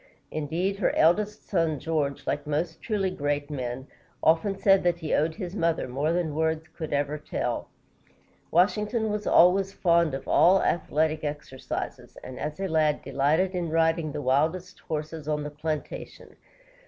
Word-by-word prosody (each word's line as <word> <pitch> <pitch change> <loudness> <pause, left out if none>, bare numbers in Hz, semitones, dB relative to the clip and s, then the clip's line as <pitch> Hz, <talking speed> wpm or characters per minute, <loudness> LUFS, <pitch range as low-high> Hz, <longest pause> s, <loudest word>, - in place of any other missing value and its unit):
Indeed, 170 +6 -1
her 195 - +1
eldest 205 +6 +2
son, 165 -5 +1
George, 150 -3 -2
like 145 +1 -2
most 160 +3 -2
truly 200 -4 -1
great 145 -2 -2
men, 130 -2 -4 0.4
often 165 +5 +3
said 195 -1 +4
that 175 -1 +1
he 160 -3 -3
owed 160 +2 +1
his 185 -3 -6
mother 165 -7 0
more 140 +5 -1
than 170 -3 -1
words 160 +1 -1
could 160 -2 -5
ever 145 +1 -1
tell. 150 - -3 0.8
Washington 210 +5 +2
was 210 0 -3
always 190 +3 +5
fond 170 -6 +2
of 135 - -7
all 190 +2 +5
athletic 155 -1 0
exercises, 145 -3 -5
and 130 - -8
as 150 +3 -4
a 195 - -1
lad 155 -3 +1
delighted 145 +7 +1
in 175 -2 -2
riding 165 -1 +1
the 145 - -5
wildest 160 +8 0
horses 155 -1 -5
on 150 -1 -1
the 150 - -5
plantation. 150 0 -6
160 Hz, 155 wpm, -27 LUFS, 150-180 Hz, 0.8 s, always